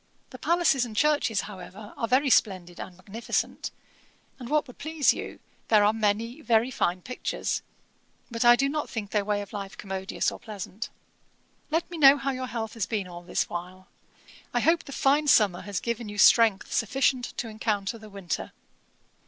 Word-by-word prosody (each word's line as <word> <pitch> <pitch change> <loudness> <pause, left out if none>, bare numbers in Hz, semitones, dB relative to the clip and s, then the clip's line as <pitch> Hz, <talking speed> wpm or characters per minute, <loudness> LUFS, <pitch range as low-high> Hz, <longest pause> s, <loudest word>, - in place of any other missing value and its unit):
The - - -10
palaces 340 -6 +2
and 230 -3 -6
churches, 290 -7 +2
however, 205 +2 -10
are 230 - -2
very 260 +3 +3
splendid 185 -6 +1
and 180 - -8
magnificent; 200 +5 -3 0.7
and 245 -2 -8
what 300 0 +2
would 250 - -14
please 315 -1 +2
you, - - -7 0.3
there 215 -2 +5
are 210 +1 +4
many 225 +5 -1
very 235 -2 +2
fine 180 -6 -1
pictures; 250 - -3 0.7
but 230 +1 -1
I 240 0 +8
do 275 +3 +1
not 300 +1 -2
think 210 -3 -5
their 210 -1 +1
way 205 0 -1
of 200 - -14
life 195 -2 -6
commodious 190 -1 -2
or - - -9
pleasant. 215 +1 -7 0.8
'Let 320 +2 0
me 340 - -6
know 280 -1 +8
how 275 0 -1
your 255 -1 -4
health 225 -3 -4
has 220 -5 -2
been 205 -4 -2
all 175 -1 -9
this 175 - -1
while. 180 +2 -7 0.7
I - - +3
hope 330 +1 +2
the - - -9
fine 285 +3 +2
summer 205 -9 +4
has 200 -1 -3
given 235 -2 -3
you 205 - -8
strength 215 -1 +5
sufficient 250 +2 +1
to 235 - -3
encounter 215 0 -2
the 215 -1 -12
winter. 195 -4 -5
225 Hz, 180 wpm, -27 LUFS, 200-260 Hz, 0.8 s, I